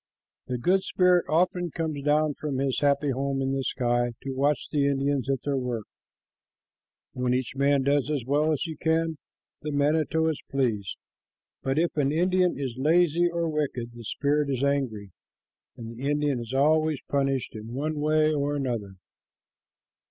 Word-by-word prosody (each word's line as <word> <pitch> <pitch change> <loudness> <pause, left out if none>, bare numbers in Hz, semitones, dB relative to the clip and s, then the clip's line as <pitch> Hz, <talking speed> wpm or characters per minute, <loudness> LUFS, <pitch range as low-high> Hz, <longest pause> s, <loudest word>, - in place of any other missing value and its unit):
The 125 - -2
good 185 +10 +2
spirit 180 -2 +3
often 175 +2 +1
comes 155 -3 -3
down 150 +1 +2
from 145 -2 -4
his 135 -1 0
happy 145 0 +2
home 135 +1 -1
in 135 0 0
the 135 0 -1
sky 120 -1 0
to 135 - -4
watch 140 +1 0
the 145 -2 +2
Indians 140 -1 0
at 135 -2 -1
their 140 -2 0
work. 120 -4 -3 1.3
When 125 0 0
each 130 0 -3
man 140 0 +2
does 140 +1 +1
as 145 -6 -1
well 150 +4 +2
as 150 - 0
he 160 -2 -5
can, 160 -1 0 0.4
the 150 - -4
manito 155 +2 +1
is 160 -3 -2
pleased, 115 -8 -1 0.6
but 135 +1 -1
if 170 +2 +1
an 140 -1 +2
Indian 180 +2 +2
is 130 -4 -4
lazy 170 +3 +3
or 170 -1 -1
wicked, 140 -6 -2
the 120 0 -10
spirit 145 +5 0
is 135 -1 -1
angry, 125 -8 -1 0.7
and 115 -2 -7
the 135 +4 -3
Indian 145 -3 +1
is 115 0 -7
always 155 +2 +2
punished 135 -2 0
in 110 +2 -7
one 150 +2 -2
way 155 +1 +3
or 145 0 0
another. 120 -8 -3
140 Hz, 165 wpm, -26 LUFS, 130-155 Hz, 1.3 s, spirit